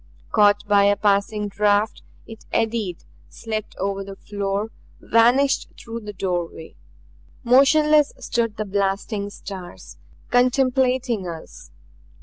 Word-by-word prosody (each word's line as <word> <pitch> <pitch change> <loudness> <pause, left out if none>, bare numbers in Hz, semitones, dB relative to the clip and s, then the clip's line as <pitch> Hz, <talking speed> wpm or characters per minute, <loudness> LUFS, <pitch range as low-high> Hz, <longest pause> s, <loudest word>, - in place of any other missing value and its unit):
Caught 205 -1 +3
by 200 -1 +4
a 205 0 +4
passing 205 +1 +1
draft, 205 +1 +1 0.2
it 225 -1 -12
eddied, 220 -6 -1 0.3
slipped 220 -2 -5
over 195 +1 -2
the 195 0 -9
floor, 200 +2 -3 0.3
vanished 250 +5 +3
through 230 0 -7
the 210 -2 -8
doorway. 175 -4 -4 0.7
Motionless 295 +4 +5
stood 230 -3 -2
the 215 - -2
blasting 200 +1 -2
stars, 190 -3 -10 0.3
contemplating 250 -3 +2
us. 165 -2 -9
210 Hz, 110 wpm, -22 LUFS, 200-235 Hz, 0.7 s, Motionless